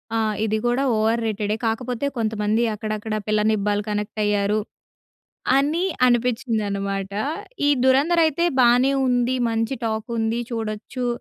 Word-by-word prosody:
ఆ! - - +2 0.3
ఇది 220 0 0
కూడా 245 +3 +1
ఓవర్ 225 +2 +1
రేటె‌డే. 210 -1 -1
కాకపోతే 245 +3 -2
కొంతమంది 220 0 0
అక్కడక్కడ, 215 0 -4
పిల్ల 215 0 +2
నిబా‌లు 205 -1 0
కనెక్ట్ 210 +1 -3
అయ్యారు, 205 0 +1 1.0
అని 300 +6 +1 0.2
అనిపించిందన్నమాట. 210 -5 -1 0.5
ఈ - - +4 0.2
'ధురంధర్' 290 +6 +4
అయితే 315 +2 0 0.2
బానే 250 +2 +5 0.2
ఉంది, 245 +1 +1
మంచి 225 +3 -1
టాకుంది, 225 +1 -2
చూడచ్చు. 225 +2 -4
225 Hz, 120 wpm, -22 LUFS, 210-245 Hz, 1.0 s, బానే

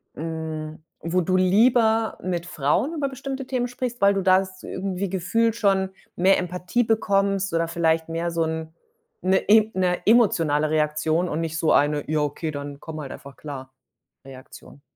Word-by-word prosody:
hm, 160 -1 -5 0.2
wo 175 +3 0
du 185 +2 +1
lieber 220 +4 +3
mit 175 -2 -2
Frauen 155 - 0
über 280 -3 -1
bestimmte 270 0 -6
Themen 250 -2 -1
sprichst, 245 -1 -5
weil 200 0 +5
du 195 - 0
das 185 0 +1
irgendwie 190 0 -3
gefühlt 215 +5 0
schon 195 -3 +1 0.3
mehr 190 +2 +4
Empathie 180 +6 -1
bekommst 195 -4 +1
oder 165 0 +1
vielleicht 165 -1 0
mehr 170 +1 -2
so 165 -1 0
'n 160 0 -4 0.5
'ne 190 +1 +3
im 215 +2 +4
'ne 180 -1 +1
emotionale 165 -10 +3
Reaktion 155 +3 0
und 150 - -2
nicht 160 0 -3
so 165 - +2
eine 145 0 +2
„Ja 155 -1 +1
okay, 150 +2 -2
dann 145 0 -7
komm 155 -1 -7
halt 135 - -7
einfach 140 0 -11
klar"-Reaktion? 130 -1 -13
180 Hz, 160 wpm, -24 LUFS, 155-200 Hz, 0.5 s, weil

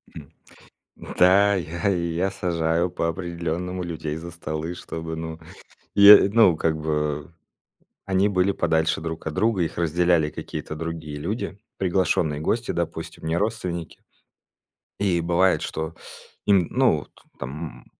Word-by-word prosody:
Хм. 75 - -9 0.7
Да, 100 +3 +4
я 85 +1 -2
я 85 +1 0
сажаю 85 -2 0
по-определённому 85 +1 -3
людей 80 -3 -4
за 85 +1 -7
столы, 80 0 -5
чтобы, 80 -1 -6
ну 80 0 -6 0.6
и, 100 0 +9
ну, 110 -7 +6
как 80 0 0
бы 75 -1 -2 0.7
они 95 +1 +2
были 95 0 +2
подальше 80 -4 +1
друг 80 0 -5
от 80 - -3
друга, 105 +2 +1
их 80 - -2
разделяли 85 -1 +2
какие-то 75 - -6
другие 80 -2 -5
люди, 95 +5 -4 0.2
приглашенные 90 -5 +1
гости, 115 +9 -1
допустим, 85 -1 -4
не 80 +1 0
родственники. 90 -6 -3 1.0
И 90 -4 +1
бывает, 90 +2 +2
что 80 +1 -4 0.5
им, 95 -5 +4
ну, 125 - +2
т - - -31 0.3
там 75 +5 -7
85 Hz, 125 wpm, -24 LUFS, 80-95 Hz, 1.0 s, и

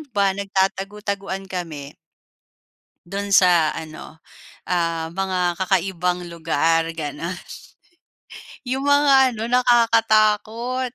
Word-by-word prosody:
ba 200 -2 +2
nagtatago-taguan 195 0 -3
kami 160 -7 -6 1.1
Dun 200 +3 -5
sa 175 -5 +4
ano 160 0 -10 0.4
ah, 165 -2 -1
mga 185 -2 -1
kakaibang 180 -1 -1
lugar 165 0 0
gano'n. 155 +4 -5 1.3
Yung 265 +2 -2
mga 275 -2 +5
ano 220 - -6
nakakatakot, 235 0 +2
195 Hz, 80 wpm, -21 LUFS, 170-220 Hz, 1.3 s, mga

